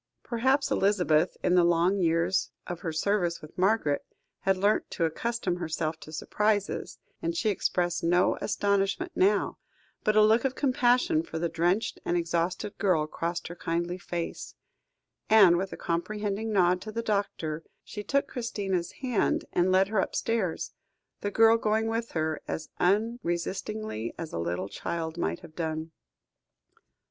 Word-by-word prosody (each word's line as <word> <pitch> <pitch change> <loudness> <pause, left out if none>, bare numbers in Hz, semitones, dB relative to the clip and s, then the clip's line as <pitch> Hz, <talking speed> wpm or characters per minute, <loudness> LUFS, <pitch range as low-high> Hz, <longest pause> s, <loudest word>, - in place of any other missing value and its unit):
Perhaps 265 +4 +1
Elizabeth, 180 -5 +2
in - - +3
the 180 -1 +6
long 175 +3 +3
years 170 +1 +2 0.2
of 175 -1 -5
her 165 - -3
service 175 +1 0
with 155 - -13
Margaret, 185 -6 +2 0.4
had 195 -1 +1
learnt 205 +3 +2
to 170 - 0
accustom 190 +2 -2
herself 160 -2 -2
to 155 - -11
surprises, 205 +5 -1 0.2
and 335 0 -2
she 220 - +1
expressed 175 -3 0
no 175 +2 +3
astonishment 200 - 0
now; 385 +4 +2 0.4
but 215 - +2
a 215 - +7
look 220 +2 +4
of 265 -1 0
compassion 250 - +3
for 160 - -6
the 170 +1 -1
drenched 175 +6 0
and 175 - 0
exhausted 170 +4 -1
girl 180 -7 +2
crossed 170 +2 -3
her 175 - -7
kindly 170 +1 -2
face; 175 -1 -5 0.7
and, 200 -6 +7
with 190 +2 -2
a - - -6
comprehending 205 +5 -2
nod 180 -2 +3
to 215 - -6
the 230 +2 -3
doctor, 170 -7 -2 0.2
she 210 - -7
took 280 +7 +1
Christina's 195 -8 -2
hand 250 -6 +1
and 180 +1 +3
led 190 +1 +4
her 215 -2 +1
upstairs, 205 -3 -1 0.5
the 205 - -2
girl 225 +2 +5
going 220 0 +1
with 225 +1 -2
her, 155 -1 -1
as 160 - -4
unresistingly 200 - -1
as 165 -2 -6
a - - -2
little 90 +3 -2
child 160 +8 -4
might 80 +1 -1
have 155 - -13
done. 160 -1 -3
185 Hz, 155 wpm, -28 LUFS, 170-215 Hz, 0.7 s, a